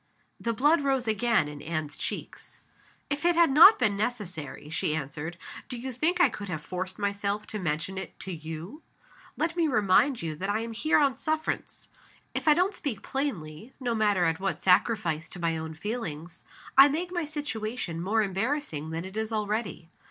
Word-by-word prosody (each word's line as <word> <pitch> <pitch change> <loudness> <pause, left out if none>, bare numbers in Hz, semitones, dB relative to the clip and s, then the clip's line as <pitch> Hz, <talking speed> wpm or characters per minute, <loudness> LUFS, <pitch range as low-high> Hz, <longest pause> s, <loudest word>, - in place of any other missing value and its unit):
The 230 - -1
blood 290 +8 +3
rose 270 -3 +1
again 220 -5 +2
in 150 -1 -8
Anne's 155 -2 -3
cheeks. - - -6 0.5
"If 285 +2 -1
it 345 0 +4
had 335 -4 +5
not 335 +10 +9
been 215 -5 +2
necessary," 200 - -4
she 155 0 -1
answered, 160 +3 -5 0.3
"do 250 - -3
you 260 +2 -4
think 310 +9 0
I - - +7
could 210 -5 -7
have 155 -4 -4
forced 185 +1 -4
myself 200 0 -1
to 215 - -5
mention 175 +2 -2
it - - -9
to 190 - -5
you? 165 - -7 0.6
Let 330 +2 0
me 335 -2 +2
remind 225 - +3
you 160 -2 -2
that 195 +5 -3
I 215 +2 +1
am 230 0 -5
here 310 +8 +2
on 280 -3 +3
sufferance. 310 0 -2 0.5
If - - -3
I 300 - +7
don't 370 +4 +2
speak 270 - -4
plainly 220 - -4
(no 245 -3 -1
matter 205 -5 +2
at 165 0 +1
what 195 0 -2
sacrifice 180 -4 +2
to - - -9
my 165 -1 0
own 160 0 -5
feelings), 170 -5 -5 0.3
I 275 +2 +9
make 345 +5 -2
my 345 -3 -1
situation 225 - -4
more 215 +5 +2
embarrassing 195 - -2
than 165 +2 -4
it 190 +2 -9
is 220 0 -2
already. 210 -5 -2
210 Hz, 185 wpm, -28 LUFS, 170-270 Hz, 0.6 s, not